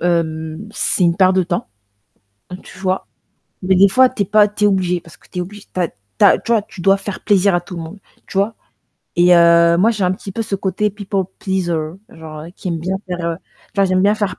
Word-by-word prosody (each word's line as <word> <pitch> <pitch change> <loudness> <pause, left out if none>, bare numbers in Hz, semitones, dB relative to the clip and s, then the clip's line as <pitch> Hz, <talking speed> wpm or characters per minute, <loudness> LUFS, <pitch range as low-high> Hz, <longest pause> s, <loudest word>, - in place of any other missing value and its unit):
hem, 160 +1 -2
c'est 185 - 0
une 170 0 +2
perte 185 -1 +4
de 185 - +4
temps, 175 - -3 0.9
tu - - -14
vois? 190 0 -1 0.6
Mais 190 +1 +3
des 195 +2 +6
fois, 255 +5 +5
tu 210 - -5
es - - -5
pas 210 +2 +4
tu 210 0 0
es - - +6
obligé 185 -3 +1
parce 170 - -16
que - - -24
tu 180 - -5
es - - 0
oblig 200 +3 -9
tu 185 - -4
as 175 - +2 0.3
tu - - +4
as - - +6
tu 235 - -4
vois? 225 - +4
Tu 210 -4 -11
dois 195 +2 +4
faire 195 0 -7
plaisir 200 -3 +3
à 175 - 0
tout 175 0 -9
le - - -5
monde, 165 +5 -9 0.3
tu - - -5
vois? 200 +3 +1 0.6
Et 175 +1 +5
heu, 170 0 +5
moi, 220 +6 +4
j'ai 210 -4 -1
un 180 - +2
petit 195 +1 -8
peu 225 - -4
ce 205 -2 -4
côté 195 +2 -1
people 200 -1 -3
pleaser, 185 -4 -1 0.3
genre 155 -5 -10
qui - - -6
aime 170 -2 -2
bien 185 +4 -2
faire, 180 -1 -4
heu, 165 - -2 0.4
genre 195 - +4
j'aime 185 -1 +2
bien 205 +2 +4
faire 205 -3 -3
185 Hz, 245 wpm, -18 LUFS, 175-200 Hz, 0.9 s, des